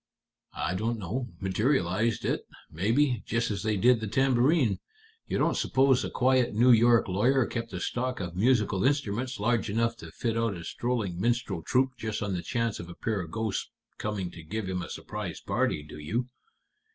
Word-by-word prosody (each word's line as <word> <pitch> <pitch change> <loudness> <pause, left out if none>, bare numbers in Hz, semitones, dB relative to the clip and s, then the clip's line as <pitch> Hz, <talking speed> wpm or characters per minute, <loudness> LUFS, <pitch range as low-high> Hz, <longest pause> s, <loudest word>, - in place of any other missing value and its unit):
"I - - -1
don't 115 +5 -1
know. 115 +6 -3
Materialized 105 +1 +1
it, - - -1 0.2
maybe, 115 - +1
just 115 0 0
as 100 -1 -2
they 110 0 0
did 120 +4 +5
the 110 - -4
tambourine. 130 - +3 0.5
You - - -1
don't - - +2
suppose 135 -1 +3
a - - -3
quiet 130 -3 +2
New 125 +3 +6
York 115 0 +5
lawyer 120 +7 +3
kept 115 -1 -4
a 90 - -4
stock 125 +6 -2
of 90 -3 -5
musical 105 -2 +2
instruments 130 -3 0
large 115 +1 +1
enough 115 +2 +1
to 80 - -10
fit 115 +7 -2
out 115 -3 0
a 85 - -8
strolling 105 -5 -2
minstrel 120 -6 0
troupe 130 +6 +1
just 110 0 -3
on 100 -2 -2
the 90 - -2
chance 115 -2 -1
of 85 - -7
a 85 - -9
pair 110 -4 -2
of 85 - -7
ghosts 110 +3 -2 0.3
coming 100 -5 -3
to 85 - -10
give 100 +6 -4
him 90 -1 -2
a - - -6
surprise - - -5
party, 75 - 0
do 75 0 -10
you? 110 +12 -1
110 Hz, 190 wpm, -28 LUFS, 95-125 Hz, 0.5 s, New